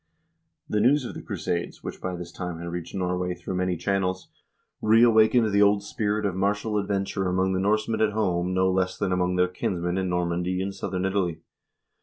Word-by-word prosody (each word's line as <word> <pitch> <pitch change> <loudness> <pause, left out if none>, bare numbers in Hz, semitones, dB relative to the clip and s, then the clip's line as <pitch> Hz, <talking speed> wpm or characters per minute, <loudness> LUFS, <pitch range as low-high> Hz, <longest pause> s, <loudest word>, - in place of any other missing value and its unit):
* - - -52
The 105 - 0
news 130 +5 +3
of - - -5
the - - -7
crusades, 85 0 -4
which - - -7
by 90 -1 -3
this 85 -1 -7
time 90 -1 -5
had 85 +1 -6
reached 85 +1 -6
Norway 90 -1 -1
through 95 - -6
many 90 -1 0
channels, 95 0 -1 0.5
reawakened 110 0 +5
the 100 0 +3
old 100 0 +4
spirit 105 0 -1
of 100 - 0
martial 105 +2 0
adventure 100 -1 -1
among 95 +1 +1
the 95 - 0
Norsemen 110 +3 +1
at 105 -1 +2
home 90 -4 0
no 95 0 +2
less 95 0 0
than 100 -2 -1
among 90 0 +1
their 90 0 +3
kinsmen 90 0 -2
in 95 -1 -1
Nor 90 0 0
mandy 90 +2 -1
and 95 +1 -2
southern 95 -1 -3
Italy. 90 -4 -1
95 Hz, 200 wpm, -26 LUFS, 90-105 Hz, 0.5 s, reawakened